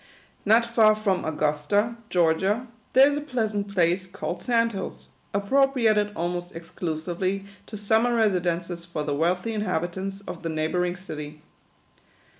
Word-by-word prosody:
Not 225 +3 +5
far 225 -2 +5
from 205 -3 0
Augusta, 155 +9 0
Georgia, 185 +7 +2 0.3
there 265 +2 +8
is 290 0 0
a - - -2
pleasant 220 -8 -2
place 180 0 +1
called 185 +2 -5
Sand 230 -2 +2
Hills, 190 -1 -6 0.2
appropriated 220 -1 +2
almost 175 +1 -3
exclu 165 -1 -4
sively 185 +4 -2 0.2
to 215 - -7
summer 220 +4 +2
residences 175 -5 0
for 170 -3 -4
the 145 -1 -2
wealthy 180 +8 0
inhabit 180 -4 -2
ants 195 +1 -4
of 180 -3 -8
the 165 - -3
neighbouring 175 +3 0
city. 150 -4 -8
190 Hz, 140 wpm, -25 LUFS, 170-215 Hz, 0.3 s, there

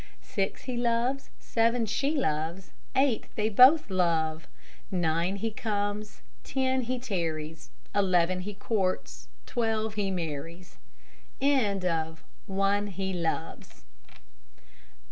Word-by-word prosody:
Six, 195 -1 -2
he 255 -2 -3
loves; 240 +3 0
seven, 230 +1 +1
she 280 +8 0
loves; 165 - -1 0.2
Eight, 265 -4 +3
they 215 0 +1
both 255 +5 +7
love. 165 -3 +1 0.4
Nine, 175 0 +1
he 225 +3 -2
comes; 210 -1 -3 0.2
ten, 260 -1 +1
he 255 +1 -2
tarries; 165 -9 -3 0.2
Eleven, 185 -2 +3
he 200 +2 -5
courts; 195 -2 -2 0.2
twelve, 220 -2 0
he 205 -2 -1
marries. 170 0 -5
205 Hz, 85 wpm, -29 LUFS, 175-235 Hz, 0.4 s, both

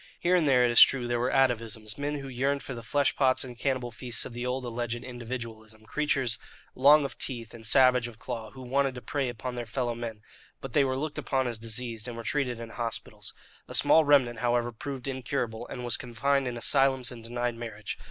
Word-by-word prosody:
Here 180 +1 +3
and 170 -4 +3
there, 125 -3 +5
it 120 - +3
is 120 - +7
true, 130 -3 +6
there 120 0 0
were 125 +2 +1
atavisms, 115 -5 +1
men 145 +1 -2
who 140 -1 -6
yearned 135 +2 -1
for 130 - -6
the 120 - -7
flesh 140 +5 +1
pots 130 -2 +3
and 125 -2 -8
cannibal 125 -1 -1
feasts 120 +1 -1
of - - -8
the 120 +1 -3
old 125 0 -2
alleged 120 0 -3
"individualism," 115 -3 -7
creatures 135 -3 0 0.3
long 145 +3 +6
of - - -6
teeth 115 -4 -4
and 115 - -11
savage 125 +1 +5
of 115 -2 -11
claw 115 -1 -6
who 130 +2 -11
wanted 135 +1 +1
to 125 - -7
prey 140 -3 -1
upon 120 +1 -5
their 120 -1 -5
fellow 120 +1 -1
men; 115 -2 -6 0.4
but 135 -3 -8
they 145 - +5
were 130 -1 0
looked 150 +2 -3
upon 135 -2 0
as 115 -2 -3
diseased, 115 0 -3
and 120 -1 -6
were 115 - -6
treated 125 -3 -1
in 115 -1 -7
hospitals. 115 -1 -5 0.3
A - - -5
small 160 - +6
remnant, 135 -6 +4
however, 120 0 +1
proved 130 +3 -6
incurable, 125 -3 -3
and 125 - -6
was 120 - 0
confined 135 +3 0
in 120 -1 -3
asylums 130 0 +2
and 120 -2 -10
denied 120 +1 -2
marriage. 110 -3 -6
125 Hz, 220 wpm, -28 LUFS, 115-135 Hz, 0.4 s, is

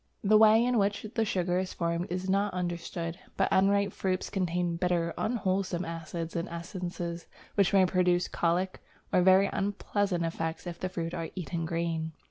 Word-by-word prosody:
The 215 +1 +4
way 220 +2 +7
in 245 -2 +2
which 205 +1 0
the 225 -2 +1
sugar 180 -2 0
is 185 0 -3
formed 170 +1 -1
is 180 +2 -3
not 195 0 +1
understood, 170 -1 -3 0.2
but - - +3
unripe 200 +1 +3
fruits 185 -1 -2
contain 175 -2 0
bitter, 170 -1 0
unwholesome 190 -5 -1
acids 165 0 -5
and 170 - -2
essences 170 0 -5 0.3
which 200 -3 +3
may 195 -2 +5
produce 180 -1 +2
colic 175 +2 0 0.3
or 180 - +5
very 190 +2 +6
unpleasant 200 -2 -1
effects 165 0 -3
if 175 -1 -6
the 185 - -2
fruits 170 -2 -4
are 165 -1 -3
eaten 170 -2 -3
green. 165 -1 -2
180 Hz, 165 wpm, -29 LUFS, 170-195 Hz, 0.3 s, way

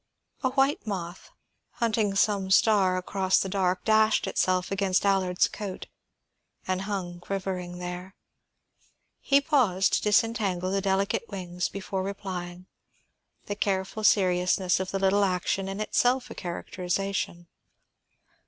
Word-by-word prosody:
A 260 - +1
white 270 -1 +1
moth, 180 -3 -5 0.4
hunting 220 -4 0
some 195 -1 +1
star 190 -2 +4
across 190 +1 +1
the - - -1
dark, 185 -2 0
dashed 220 0 +3
itself 185 -1 0
against 195 -1 +1
Allard's 190 -2 +2
coat 200 -3 -6 0.8
and 185 0 0
hung 175 -3 -4
quivering 180 -1 -4
there. 180 +2 -7 1.0
He 280 0 +4
paused 245 - +2
to - - +2
disentangle 205 -4 +1
the 195 0 0
delicate 195 +3 0
wings 180 -3 -3
before 195 -1 -4
replying, 185 -2 -6 0.8
the 205 - -3
careful 195 +1 -2
seriousness 185 -2 +3
of 190 0 -3
the 195 - -2
little 195 +1 +3
action 190 +1 0
in 195 +1 -5
itself 245 +3 +1
a - - -5
characterization. 180 0 -3
195 Hz, 125 wpm, -27 LUFS, 185-205 Hz, 1.0 s, star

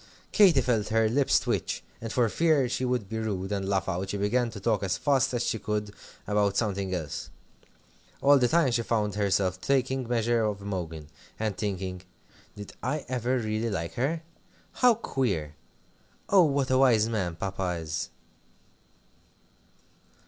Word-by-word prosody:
Katy 185 -10 +6
felt 115 -4 0
her 110 0 +2
lips 135 +5 +3
twitch, - - -2 0.2
and 115 -1 -5
for 120 -1 +2
fear 155 +1 +2
she 125 +1 -2
should 125 -5 -1
be 110 +2 -4
rude, 100 -3 -3
and 100 -1 -2
laugh 95 -1 0
out, 95 +1 -2
she 100 - -2
began 115 +5 +1
to 110 - -8
talk 110 +1 +1
as 95 -1 -1
fast 135 -1 +2
as 120 - 0
she 115 - -1
could 105 0 -3 0.3
about 105 -1 +1
something 100 -4 -1
else. 80 -5 -4 0.9
All 140 0 +5
the 125 - +3
time 160 -2 +3
she 115 0 +1
found 110 -3 0
herself 95 -2 0
taking 130 -2 0
measure 120 -1 +1
of 105 -2 -1
Imogen, 85 -6 -5 0.3
and 110 -3 -1
thinking 95 -3 -3 0.5
"Did 105 -1 -9
I 150 -1 -2
ever 125 0 0
really 110 0 -1
like 85 -5 -3
her? 155 +7 -1 0.5
How 250 -2 +4
queer! 100 - -2 0.8
Oh, 190 -4 +6
what 140 -3 0
a 130 - +4
wise 115 -5 +4
man 95 -7 -2
Papa 95 -1 -3
is!" 80 -1 -4
110 Hz, 160 wpm, -27 LUFS, 95-125 Hz, 0.9 s, Katy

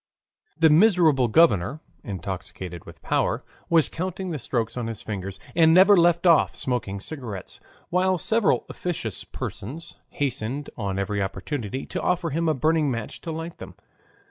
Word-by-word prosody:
The 160 -1 +5
miserable 160 - +5
governor, 130 - +3 0.2
intoxicated 95 - -6
with - - -14
power, - - 0 0.3
was 165 -2 +6
counting 185 +1 -4
the 155 - -3
strokes 115 -2 -2
on 120 -2 -3
his 115 -2 -5
fingers, 100 -2 -5 0.2
and 160 -1 +6
never 195 +3 +8
left 170 0 +3
off 170 -3 +5
smoking 110 -6 -2
cigarettes, 110 - -6 0.3
while 185 +1 +2
several 220 +5 +2
officious 135 - -3
persons 155 - -7
hastened 140 0 -3
on 100 -4 -3
every 100 +1 -1
opportunity 125 +4 -4
to - - -4
offer 175 -3 0
him 165 +2 0
a 155 - +2
burning 155 +2 +2
match 115 -4 -4
to 165 - -5
light 165 +1 -6
them. - - -10
145 Hz, 150 wpm, -25 LUFS, 110-170 Hz, 0.3 s, never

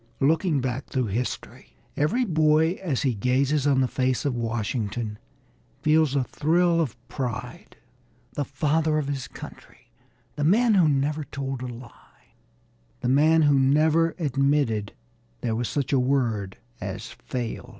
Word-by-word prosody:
Looking 155 +1 +2
back 130 +1 -3
through 130 -4 -1
history 125 +3 -5 0.2
every 205 - +1
boy 160 -2 +3
as 160 -9 -1
he 130 -3 +2
gazes 135 +6 +1
on 135 -2 +3
the 130 - +2
face 130 +2 -1
of 140 - +1
Washington 115 -1 -3 0.6
feels 155 -2 +3
a 135 - +2
thrill 170 +6 +2
of 130 -7 -3
pride; 125 -4 -6 0.6
the 145 - -1
Father 155 +3 0
of 150 -2 -1
His 140 -2 -3
Country, - - -13 0.5
the 145 - -1
man 220 +8 +4
who 180 -6 +5
never 145 +2 0
told 135 -1 -5
a 125 - -4
lie, 120 0 -13 0.7
the 125 - 0
man 155 +4 +4
who 145 -2 +4
never 155 +4 +3
admitted 140 - 0 0.5
there 115 -2 -1
was 120 +1 -2
such 140 -2 -2
a 135 - +4
word 120 -7 0 0.2
as - - -5
"fail." 120 -3 -5
140 Hz, 145 wpm, -25 LUFS, 125-155 Hz, 0.7 s, who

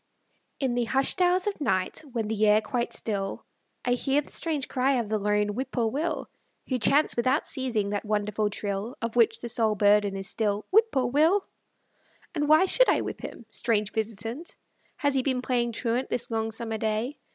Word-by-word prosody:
IN 265 -3 0
the 240 -1 0
hushed 270 +9 +1
hours 360 +1 +3
of 405 -6 -3
night, 185 -9 0
when 230 -3 -2
the 215 0 +1
air 210 +1 +6
quite 235 +3 -2
still, 195 -3 -3 0.4
I 245 - +1
hear 270 +3 +1
the - - -17
strange 305 -5 -1
cry 265 +1 +1
of 235 -5 -1
the 215 0 0
lone 210 0 +1
whippoorwill, 255 +6 -2 0.4
Who 255 -2 0
Chants, 285 +6 +3
without 255 +5 +1
ceasing, 235 -7 -1
that 205 - -2
wonderful 210 0 0
trill, 205 +3 -4
Of 230 0 -4
which 235 -2 +4
the 240 - -4
sole 225 -2 +1
burden 205 0 +3
is 195 0 -5
still, 210 -1 -1
"Whip 445 +3 +5
poor 260 -2 +1
Will." 315 +10 +3 0.9
And 295 -3 -1
why 310 +4 +6
should - - +4
I - - +3
whip - - -5
him? 235 - -8
Strange 215 -4 0
visitant, 225 - -4 0.4
Has 285 -1 +1
he 265 - +2
been 255 -1 -1
playing 240 -2 0
truant 240 +3 -1
this 240 - -2
long 225 0 -1
summer 225 0 -4
day? 220 +6 -2
235 Hz, 185 wpm, -27 LUFS, 215-270 Hz, 0.9 s, air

